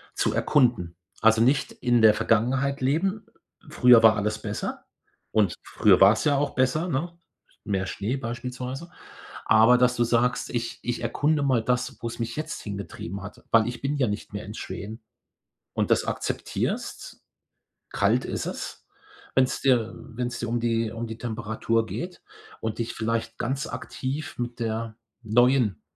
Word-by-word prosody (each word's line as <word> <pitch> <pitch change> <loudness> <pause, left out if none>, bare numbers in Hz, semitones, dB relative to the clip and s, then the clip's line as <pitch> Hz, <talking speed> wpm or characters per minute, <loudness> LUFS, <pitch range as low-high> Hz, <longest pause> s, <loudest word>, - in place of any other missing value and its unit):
zu - - +1
erkunden. 120 - +2 0.3
Also, 110 0 +5
nicht 135 +4 +2
in 120 -1 +1
der 110 -1 +8
Vergangenheit 130 +6 +1
leben. 190 +10 0 0.4
„Früher 125 -5 +6
war 110 -1 +7
alles 105 +1 -1
besser“ - - -4 0.5
und 105 -5 +2
früher 95 -4 +3
war's 100 +7 +6
ja 145 -2 +4
auch 145 0 -1
besser, 130 +7 +1
ne? 170 +4 -2 0.5
Mehr 95 -2 -1
Schnee 105 +7 -3
beispielsweise. 125 +5 -5 0.5
Aber, 115 +3 +6
dass 125 0 +3
du 120 - +3
sagst: 125 +2 +1
„Ich 120 +1 -3
ich 120 0 -2
erkunde 145 +6 +1
mal 130 -4 +2
das, 125 0 -1
wo 115 - -3
es 115 - -7
mich 115 0 -3
jetzt 155 - -4
hingetrieben 100 -2 -6
hat, 100 - -10
weil 115 -1 +5
ich 120 0 -5
bin 140 +2 -1
ja 130 -3 +2
nicht 105 0 -4
mehr 105 -1 -5
in 105 - -8
Schweden“ 110 +1 -7 0.7
und - - 0
das - - +3
akzeptierst. - - -3 0.7
Kalt - - +2
ist - - -3
es, - - -6 0.5
wenn's 130 -1 +2
dir, 120 -4 +3
äh 120 -3 -13
wenn's 120 -1 -3
dir 120 - -3
um 120 +1 0
die 115 -1 0
um 115 +1 -4
die 110 0 -7
Temperatur 115 0 -1
geht 180 +8 -6 0.4
und 110 -1 -3
dich 115 0 -2
vielleicht 115 0 -2
ganz 135 +3 -1
aktiv 140 +4 -5
mit 120 0 -4
der 115 -1 -3 0.3
neuen 120 0 +3
120 Hz, 160 wpm, -26 LUFS, 110-130 Hz, 0.7 s, der